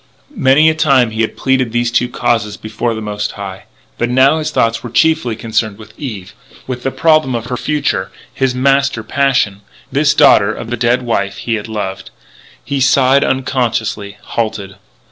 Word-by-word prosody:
Many 150 - +4
a 160 - +4
time 135 -7 +3
he 110 +1 -2
had 110 - -2
pleaded 130 -3 +1
these 120 0 0
two 120 +1 +1
causes 115 -4 -1
before 110 +2 -3
the 110 - -5
Most 105 -1 -3
High. 95 -2 -8 0.3
But 120 - 0
now 135 +5 +4
his 155 -1 -2
thoughts 115 -5 0
were 120 - -7
chiefly 140 -2 +2
concerned 110 -2 -2
with 110 0 -14
Eve 105 -8 -7 0.3
with 125 -1 -5
the 135 - -1
problem 155 -3 +2
of 115 -1 -3
her 125 +1 -3
future 140 -8 -1 0.2
his 135 -2 0
master 135 -2 +1
passion 125 -5 0 0.3
this 145 +1 +2
daughter 110 -8 +5
of 115 +1 -7
the - - 0
dead 120 +2 +1
wife 100 -4 -1
he 115 - -3
had 110 -1 -3
loved. 105 -3 -5 0.6
He 140 -1 -2
sighed 135 +1 +4
unconsciously; 115 -6 -1
halted. 110 -4 -4
120 Hz, 175 wpm, -15 LUFS, 110-135 Hz, 0.6 s, daughter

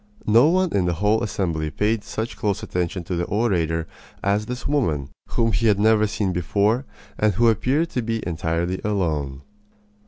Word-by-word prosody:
No 115 +6 +6
one 185 +1 +2
in 95 -3 +2
the 85 -1 0
whole 105 +5 +2
assembly 85 -8 -1
paid 105 +5 0
such 110 +1 -4
close 100 -2 -1
attention 90 0 -2
to 90 +2 -3
the 85 0 -1
orator 85 -7 0 0.4
as 100 +2 +1
did - - -12
this 125 0 -5
woman, 80 - 0 0.2
whom 115 -1 +1
he 110 +2 +1
had 105 -2 +4
never 110 0 +4
seen 100 -3 -1
before 100 - +1 0.3
and 105 -3 +2
who 120 +4 +4
appeared 135 +9 +1
to 125 - -1
be 115 0 -3
entirely 85 +1 -2
alone. 75 -10 -1
105 Hz, 180 wpm, -23 LUFS, 85-115 Hz, 0.4 s, No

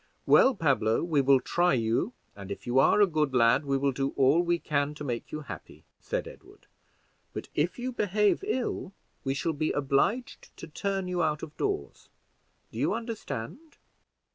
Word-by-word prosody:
"Well, 265 - +6
Pablo, 135 - +1
we 160 -4 +2
will 135 0 +5
try 175 +2 +2
you, 115 - 0 0.2
and 100 -1 -10
if 100 - -7
you 125 +2 +2
are 170 - +5
a - - +8
good 155 -6 -1
lad 125 +4 +4
we 135 -1 +1
will 140 0 +1
do 135 +1 -2
all 140 +5 +4
we 175 0 +1
can 150 -2 -1
to 150 - -7
make 120 -4 -4
you 155 - -4
happy," 145 - -10
said - - -3
Edward; - - -15 0.7
"but - - -6
if 165 +4 0
you 250 +1 -3
behave 210 - +1
ill 245 - -2 0.3
we 135 0 -1
shall 160 +4 -1
be 155 +1 -1
obliged 145 - -1
to - - -8
turn 195 +4 -3
you 180 -1 -1
out 150 -2 0
of 155 -2 -8
doors: 400 -1 -3 0.6
do - - -7
you - - +1
understand?" 230 - -6
150 Hz, 180 wpm, -28 LUFS, 135-195 Hz, 0.7 s, a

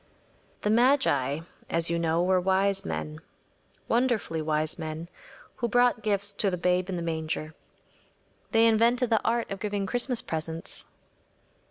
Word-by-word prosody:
‚ÄĚ - - -35
The 210 - +1
magi, 220 - +3 0.3
as 165 0 0
you 170 - 0
know, 165 +1 +1
were 185 0 +3
wise 195 +1 +1
men‚ÄĒwonderfully 195 +5 -3
wise 155 0 0
men‚ÄĒwho 170 +10 -7
brought 245 -1 +3
gifts 205 -1 0
to 200 0 +1
the 180 - -2
Babe 180 +1 +1
in 185 - -2
the 170 - -3
manger. 160 -1 -3 1.0
They 225 -1 +4
invented 235 +2 +3
the 225 - +3
art 230 -1 0
of 195 - -4
giving 205 -1 -2
Christmas 245 +4 -1
presents. 160 +1 -4
190 Hz, 140 wpm, -27 LUFS, 165-225 Hz, 1.0 s, They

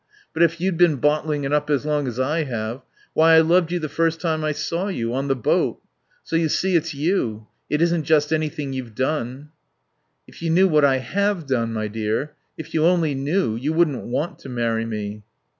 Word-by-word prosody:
But 160 - -2
if 170 0 +3
you'd 185 -1 0
been 175 -4 +5
bottling 150 +1 0
it 140 +1 -1
up 150 0 +1
as 145 -1 +1
long 150 -2 0
as 125 0 -4
I 150 +5 +1
have 120 0 -4 0.3
Why, 160 +1 +6
I 160 - +8
loved 170 +1 +3
you 175 - 0
the 155 -3 -3
first 165 +1 0
time 160 -2 -1
I 155 - +1
saw 165 +5 -2
you. 120 - -2
On 135 +2 -1
the 135 - +1
boat.... 125 - 0 0.4
So - - -4
you 165 -1 +2
see, 185 +4 +1
it's 160 -2 0
you. 140 - -1 0.2
It 150 +2 +2
isn't 170 -2 +1
just 150 0 +3
anything 150 -3 -2
you've 125 -4 -6
done." 130 +1 -2 0.8
"If - - -15
you 165 - -1
knew 185 +4 +5
what 155 -4 +3
I 135 -2 +4
have 190 - -1
done, 120 -4 0
my 110 -1 -2
dear. 110 +7 -2 0.2
If 160 - -9
you 155 - +2
only 165 -3 +3
knew. 140 - 0
You 140 +7 -2
wouldn't 160 -6 +1
want 145 +8 -3
to 135 - -10
marry 115 -2 -1
me." 105 -2 -5
150 Hz, 210 wpm, -22 LUFS, 130-165 Hz, 0.8 s, I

